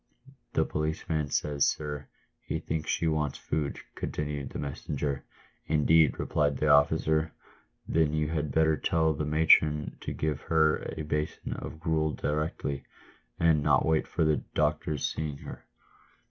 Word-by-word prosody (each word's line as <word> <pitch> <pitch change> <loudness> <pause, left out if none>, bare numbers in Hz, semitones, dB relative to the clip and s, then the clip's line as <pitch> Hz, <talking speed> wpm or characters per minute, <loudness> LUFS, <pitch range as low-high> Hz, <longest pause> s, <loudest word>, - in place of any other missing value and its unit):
" 135 0 -23
The - - +3
policeman 75 -1 -2
says, 75 0 +1
sir, 75 -1 -3 0.3
he - - -3
thinks 80 -1 -3
she - - 0
wants 75 -3 0
food," 75 -2 -2 0.2
continued 75 -2 -4
the - - -6
messenger. 70 0 -3 0.4
"Indeed," 80 -1 +4
replied 70 -2 0
the 75 - +1
officer; 75 +2 +3 0.5
"then 80 -2 +2
you 75 -1 0
had 75 -3 -2
better 80 +1 +3
tell 80 -1 +2
the 75 +1 -3
matron 75 -1 +4
to - - -4
give 75 -1 -2
her 80 -1 +2
a 80 - -3
basin 75 0 -3
of 80 - -7
gruel 80 -2 0
directly, 75 -2 -2 0.6
and 80 -3 +4
not - - +3
wait 80 -1 +2
for - - 0
the 80 -1 +3 0.2
doctor's 75 -3 0
seeing 75 -2 -4
her." - - -10
75 Hz, 145 wpm, -29 LUFS, 75-80 Hz, 0.6 s, Indeed